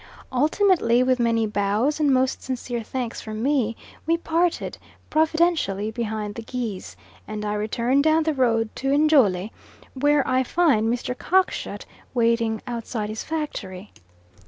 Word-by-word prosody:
Ultimately, 295 - +3
with 255 0 +2
many 230 -1 +2
bows 210 +8 0
and 295 -2 +3
most 260 0 +1
sincere 245 -2 -4
thanks 240 +1 -4
from 215 0 -5
me, 255 -5 +1 0.3
we 330 +1 +3
parted, 335 +1 -1 0.3
providentially 315 - +1
beyond 215 -2 -3
the 230 - -7
geese, 225 -5 -5 0.3
and 210 0 -5
I 210 - -1
returned 235 +6 +1
down 315 +1 +3
the 315 0 0
road 230 -5 +1
to 270 - -2
Njole, 225 - +3 0.4
where 290 +1 +2
I 255 0 +2
find 260 -6 +2
Mr. 245 +1 -2
Cockshut 375 +7 0 0.3
waiting 230 -2 +1
outside 230 -3 -4
his 215 0 -5
factory. 210 -12 -5
245 Hz, 135 wpm, -24 LUFS, 220-295 Hz, 0.4 s, Ultimately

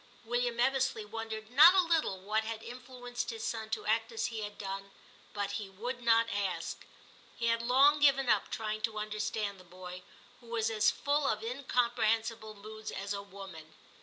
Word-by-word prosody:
William 240 0 0
Ebbesley 260 -3 +1
wondered 220 0 -6
not 315 +8 +9
a 375 - +6
little 325 - +1
what 215 +3 0
had 225 0 -5
influenced 245 0 -6
his 225 -1 -5
son 220 -1 -3
to - - -3
act 225 +2 +1
as 225 - -1
he 225 - -3
had 210 0 -6
done, 195 0 -5 0.4
but 205 -1 -2
he 200 - -7
would 235 +6 -5
not 230 -1 +4
ask. 200 -2 -3 0.5
He 230 - -2
had 230 0 +2
long 270 +5 +5
given 275 -2 +4
up 215 -4 +2
trying 215 -2 -3
to 220 -1 -2
understand 210 -1 -2
the - - -13
boy, 180 +1 -9 0.4
who 240 - -18
was 225 -1 0
as 215 -1 +4
full 285 0 0
of 215 0 0
incomprehensible 230 -3 0
moods 215 +1 -8
as 200 +1 -4
a 200 - -3
woman. 190 -6 -11
225 Hz, 180 wpm, -32 LUFS, 210-245 Hz, 0.5 s, not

